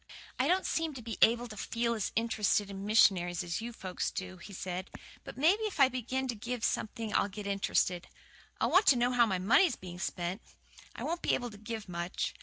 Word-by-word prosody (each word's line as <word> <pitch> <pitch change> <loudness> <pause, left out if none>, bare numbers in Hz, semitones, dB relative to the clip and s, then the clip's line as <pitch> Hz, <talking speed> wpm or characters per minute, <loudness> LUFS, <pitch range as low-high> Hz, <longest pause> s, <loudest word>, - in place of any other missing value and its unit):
"I - - +3
don't 370 +2 +2
seem 325 -3 -1
to 250 - -7
be 225 -1 -6
able 240 +2 +5
to 215 - -9
feel 235 +2 -1
as 215 -4 -2
int'rested 210 -3 +1
in 195 +1 -6
missionaries 180 -5 +4
as 170 +3 -3
you 235 +1 -5
folks 185 -5 -3
do," 185 0 -6
he 185 +4 -11
said, 185 0 -5 0.3
"but - - -10
maybe 345 +10 +4
if 405 -7 -4
I 270 -2 +7
begin 255 +1 -2
to - - 0
give 235 +2 -5
something 220 -1 -2
I'll - - +2
get 205 +1 -7
int'rested. 195 -3 0 0.5
I'll - - +1
want 380 +3 +5
to 275 - +8
know 245 +1 +2
how 240 -2 +4
my 190 -3 0
money's 255 - +4
being 175 -1 -9
spent. 180 +1 -3 0.5
I - - -6
won't 340 +1 -2
be - - +2
able 245 -1 -4
to 210 - -11
give 220 -1 -6
much. 175 0 -3
220 Hz, 215 wpm, -31 LUFS, 190-245 Hz, 0.5 s, to